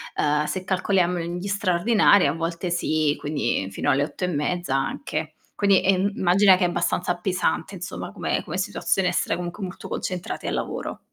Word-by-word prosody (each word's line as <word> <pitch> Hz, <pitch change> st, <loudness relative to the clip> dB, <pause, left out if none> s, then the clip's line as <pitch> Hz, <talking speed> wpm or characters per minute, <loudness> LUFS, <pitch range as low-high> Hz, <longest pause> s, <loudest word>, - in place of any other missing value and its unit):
Ehm, 150 Hz, 0 st, +1 dB
se 185 Hz, +4 st, -3 dB
calcoliamo 185 Hz, -2 st, +1 dB
gli 175 Hz, +3 st, -4 dB
straordinari 200 Hz, -1 st, +4 dB
a 140 Hz, -, +1 dB
volte 170 Hz, +2 st, -3 dB
sì 155 Hz, -3 st, +1 dB
quindi 130 Hz, -9 st, -1 dB
fino -, -, 0 dB
alle 140 Hz, +1 st, +2 dB
8 170 Hz, -, -6 dB
e -, -, +2 dB
mezza 170 Hz, -1 st, -1 dB
anche. 155 Hz, +3 st, -3 dB, 0.2 s
Quindi 200 Hz, -2 st, +3 dB
è 190 Hz, -1 st, +3 dB
mhmm, 200 Hz, +2 st, +1 dB
immagina 190 Hz, +2 st, +5 dB
che 185 Hz, -, 0 dB
è -, -, +3 dB
abbastanza 175 Hz, +1 st, 0 dB
pesante 185 Hz, +2 st, -1 dB
insomma, 185 Hz, +2 st, -6 dB
come -, -, -1 dB
come -, -, -5 dB
situazione 185 Hz, -2 st, 0 dB
essere 175 Hz, -, 0 dB
comunque, 180 Hz, +3 st, -5 dB
molto 185 Hz, 0 st, -7 dB
concentrate 180 Hz, -1 st, -4 dB
al -, -, -1 dB
lavoro. -, -, -4 dB
180 Hz, 180 wpm, -24 LUFS, 160-190 Hz, 0.2 s, immagina